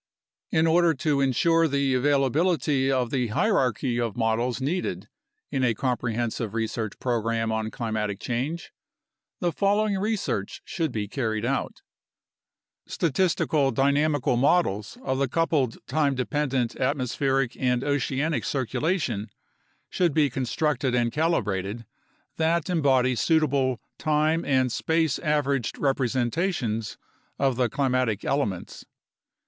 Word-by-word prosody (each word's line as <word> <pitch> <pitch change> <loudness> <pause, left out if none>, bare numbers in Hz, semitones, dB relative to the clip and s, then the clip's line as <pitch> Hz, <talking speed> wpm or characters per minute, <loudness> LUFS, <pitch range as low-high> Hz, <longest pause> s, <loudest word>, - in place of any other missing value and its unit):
In 160 0 +2
order 165 0 +4
to 145 0 0
ensure 165 +5 +3
the 140 -2 +1
availability 140 +1 +2
of 125 -3 0
the 125 -3 0
hierarchy 125 - +1
of 115 -1 -2
models 115 +2 0
needed 165 +7 -2 0.4
in 130 - 0
a 120 -3 +2
comprehensive 120 -3 -2
research 110 -1 -3
program 115 -2 -1
on 110 0 -1
climatic 110 -4 -3
change, 135 +9 -3 0.7
the 175 -2 +1
following 200 +1 +1
research 200 - -2
should 165 -5 -2
be 105 -3 -3
carried 110 -2 -2
out: 135 +2 -2 1.0
Statistical 160 -3 +1
dynamical 140 -1 +2
models 120 - +1
of 130 0 -1
the 140 - +2
coupled 145 -4 0
time 140 0 +1
dependent 130 -2 -1
at 135 +3 0
mospheric 135 0 0
and 125 -1 +1
oceanic 145 +2 0
circulation 130 - -1 0.6
should 175 -5 0
be 150 -3 +3
constructed 130 0 0
and 120 -1 +1
calibrated 115 - -1 0.5
that 165 +2 +1
embody 135 -6 +3
suitable 140 -3 +1 0.2
time 155 +2 +1
and 130 -2 +2
space 160 +2 0
averaged 140 -6 0
representations 130 - -1 0.4
of 135 -2 +1
the 125 -1 +1
climatic 130 -5 0
elements. 105 -11 -2
135 Hz, 115 wpm, -26 LUFS, 120-155 Hz, 1.0 s, order